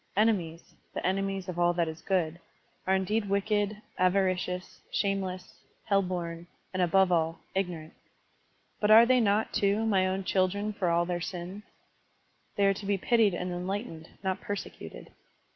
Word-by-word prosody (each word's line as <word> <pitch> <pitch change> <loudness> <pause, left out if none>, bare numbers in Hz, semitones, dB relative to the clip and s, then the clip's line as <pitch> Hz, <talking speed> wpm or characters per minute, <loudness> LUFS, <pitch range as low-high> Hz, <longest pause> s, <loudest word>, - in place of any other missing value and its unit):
Enemies 180 -7 0
— - - -39
the - - -3
enemies 195 0 -1
of 175 -1 -4
all 175 0 +4
that 170 -1 0
is 160 0 -6
good 175 -4 0 0.2
— - - -36
are 190 - +4
indeed 205 +2 0
wicked, 205 +1 0 0.2
avaricious, 185 -1 0
shameless, 190 -2 -2 0.2
hell 200 -2 +3
bom, 175 -2 -4 0.3
and, 185 - 0
above 185 +1 +4
all, 165 -1 +1
ignorant. 175 -5 -3 0.9
But 210 - +1
are 225 +2 +9
they 255 +1 +4
not, 215 -1 +1
too, 205 +2 +2
my 190 -4 +3
own 190 +1 -1
children 200 +3 0
for 185 -3 0
all 170 +1 +2
their 175 0 -2
sins? 180 +3 -5 0.9
They 200 - +3
are 195 - +4
to 195 - -8
be 200 -1 +2
pitied 215 -2 +3
and 180 +1 -3
enlightened, 180 -2 -4
not 190 -1 -1
persecuted. 205 -1 -7
190 Hz, 160 wpm, -29 LUFS, 175-200 Hz, 0.9 s, are